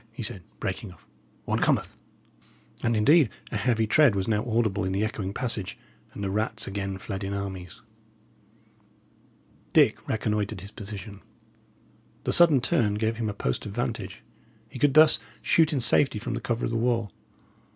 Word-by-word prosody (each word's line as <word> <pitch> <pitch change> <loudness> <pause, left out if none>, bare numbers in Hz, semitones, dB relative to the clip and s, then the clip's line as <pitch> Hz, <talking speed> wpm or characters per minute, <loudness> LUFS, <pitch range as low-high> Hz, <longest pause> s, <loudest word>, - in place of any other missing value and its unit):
he 115 - -7
said, 100 -3 -4 0.2
breaking 95 +1 -4
off 85 - -19 0.4
"one - - 0
cometh." - - +1 0.9
And 115 - +1
indeed 140 +5 +5 0.2
a - - -3
heavy 110 +1 +1
tread 125 0 +4
was 95 -1 -1
now 105 -1 +1
audible 110 -4 0
in 95 0 -1
the 100 +2 0
echoing 100 -3 -4
passage, 115 -4 -3 0.4
and 100 - -5
the 95 - -2
rats 110 +2 -1
again 95 -1 -4
fled 95 0 -6
in 100 +1 -3
armies. 95 +1 -6 1.9
Dick - - +5
reconnoitred 105 -3 -1
his 100 +1 -9
position. 105 -1 -8 1.0
The - - 0
sudden 160 -7 +6
turn 115 -9 +1
gave 110 +1 -1
him 115 -2 -2
a - - -3
post 65 -5 -2
of 100 - -7
vantage. 120 0 -4 0.5
He - - -9
could 145 +1 +3
thus 155 0 +7 0.2
shoot 160 -1 +3
in 145 - 0
safety 120 +1 +3
from 105 - -4
the - - -3
cover 120 0 -1
of - - -2
the 115 - 0
wall. 115 -3 0
110 Hz, 170 wpm, -26 LUFS, 100-120 Hz, 1.9 s, thus